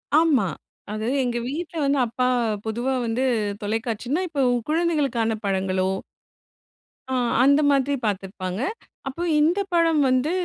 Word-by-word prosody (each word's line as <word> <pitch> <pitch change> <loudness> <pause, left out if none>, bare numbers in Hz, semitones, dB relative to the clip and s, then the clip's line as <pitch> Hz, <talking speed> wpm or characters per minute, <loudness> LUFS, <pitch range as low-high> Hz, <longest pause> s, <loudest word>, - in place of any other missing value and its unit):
ஆமா, 305 -10 +4 0.5
அது 215 +1 -3 0.2
எங்க 240 -1 -1
வீட்ல 325 +4 -5
வந்து 275 0 +2
அப்பா 250 +2 -1 0.4
பொதுவா 240 +4 -1
வந்து 230 +3 0 0.4
தொலைக்காட்சின்னா, 230 - -2
இப்போ 285 -4 -1 0.3
குழந்தைகளுக்கான 285 -9 +1
படங்களோ 190 -1 0 1.2
ஆ, - - +1 0.3
அந்த 280 +2 +5
மாதிரி 280 +1 +2
பார்த்திருப்பாங்க. 190 0 -3 0.5
அப்போ 300 +6 -4 0.2
இந்த 340 +6 +3
படம் 330 -3 +3
வந்து 255 +5 +2
255 Hz, 115 wpm, -24 LUFS, 220-300 Hz, 1.2 s, அந்த